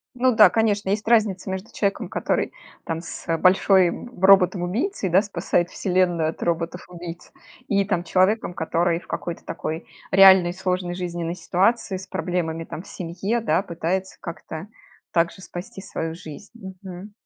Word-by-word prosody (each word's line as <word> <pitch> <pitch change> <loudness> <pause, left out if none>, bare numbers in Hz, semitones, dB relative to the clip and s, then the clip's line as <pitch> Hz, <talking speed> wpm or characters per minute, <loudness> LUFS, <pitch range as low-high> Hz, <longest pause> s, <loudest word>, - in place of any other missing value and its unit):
Ну, 250 -1 +3
да, 210 -4 +8
конечно, 210 -1 +1
есть 210 +1 -1
разница 210 -5 +2
между 190 +5 -5
человеком, 200 -1 -1
который - - -1 0.3
там 165 0 -3
с 170 - -9
большой 185 0 +5
б 190 -4 -2
роботом-убийцей, 195 - +3
да, 190 +3 +5
спасает 175 -3 -1
вселенную 180 -4 +1
от - - -14
роботов-убийц, 170 0 -4 0.4
и 200 -1 +2
там 180 -4 0
человеком, 185 0 +2
который 170 +1 0
в 170 - -19
какой-то 170 -1 -5
такой 160 +2 -5 0.2
реальной 190 -2 +7
сложной 180 -1 -2
жизненной 175 -1 -3
ситуации, 190 +4 +1
с 190 - -10
проблемами, 170 -3 -2
там, 165 - -7
в - - -16
семье, 190 +7 -3
да, 210 -3 +1
пытается 185 +1 -3
как-то 165 0 -7 0.5
также 170 +2 0
спасти 180 +2 -8
свою 165 -4 -4
жизнь. 165 +4 -10 0.3
Мгм. 190 +2 -9
185 Hz, 145 wpm, -23 LUFS, 170-195 Hz, 0.5 s, да